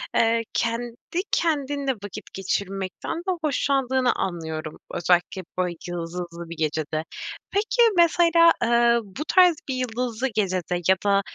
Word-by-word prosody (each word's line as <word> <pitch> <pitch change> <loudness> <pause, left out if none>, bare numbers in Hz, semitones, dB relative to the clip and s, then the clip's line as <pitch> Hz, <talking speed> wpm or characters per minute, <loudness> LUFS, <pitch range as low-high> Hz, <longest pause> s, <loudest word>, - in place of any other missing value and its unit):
eee, 230 0 +3
kendi 235 +7 -2
kendinle 285 -4 0
vakit 205 - -7
geçirmekten 195 - -3
de 365 +2 -2
hoşlandığını 265 -3 +1
anlıyorum. 160 -4 -4
Özellikle 175 +2 +1 0.2
böyle 180 -1 0
yıldızlı 170 0 -5
bir 170 - -7
gecede. 155 0 -1 0.5
Peki, 425 +4 +1 0.2
mesela, 335 0 +6
eee, 235 0 +4
bu 205 +9 -7
tarz 360 -3 +6
bir 260 - -1
yıldızlı 250 0 -2
gecede 185 -3 0
ya 190 - +6
da, 200 -1 +4
230 Hz, 120 wpm, -24 LUFS, 180-275 Hz, 0.5 s, mesela